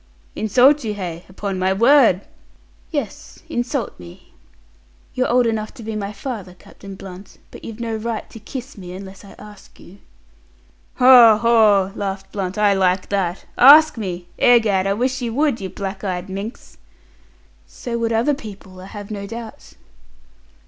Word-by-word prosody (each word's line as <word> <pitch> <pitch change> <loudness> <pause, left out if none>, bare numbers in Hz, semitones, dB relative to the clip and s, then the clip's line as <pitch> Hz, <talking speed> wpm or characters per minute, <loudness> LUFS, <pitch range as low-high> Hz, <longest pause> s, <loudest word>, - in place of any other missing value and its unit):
"Insult 250 +7 +3
you, 215 -2 -3
hey! 175 -3 -6
Upon 195 0 -5
my 185 +1 +1
word!" 230 -3 +4 0.7
"Yes, 280 - -6
insult 240 0 -3
me. 85 -1 -14 0.8
You're 255 - -1
old 245 0 +3
enough 220 0 -2
to 240 - -11
be 220 0 -5
my 205 -1 -4
father, 205 -4 -7
Captain 195 +1 -13
Blunt, 190 0 -12
but - - -12
you've 225 0 -8
no 230 -1 -3
right 225 0 -4
to 225 - -11
kiss 250 +2 -9
me, 180 -1 -9
unless 190 +1 -10
I 200 - -14
ask 210 -1 -15
you." 195 +3 -16 1.0
"Haw, 245 -4 +7
haw!" 215 -4 +3
laughed 195 -2 -5
Blunt. 195 0 -4
"I 210 -1 +3
like 185 -1 0
that. 190 -3 -2
Ask 300 +5 +8
me! 180 -6 -5
Egad, 215 -6 +3
I 195 - +1
wish 255 +4 -1
you 235 -2 -3
would, 285 -6 +1
you 190 - -5
black 195 +1 -6
eyed 185 -2 -4
minx!" 200 +6 -8 0.9
"So 235 -1 -6
would 230 0 -1
other 230 +6 +2
people, 195 -7 -10
I 185 - -10
have 205 +1 -9
no 200 -1 -5
doubt." 230 0 -10
210 Hz, 160 wpm, -20 LUFS, 195-235 Hz, 1.0 s, Ask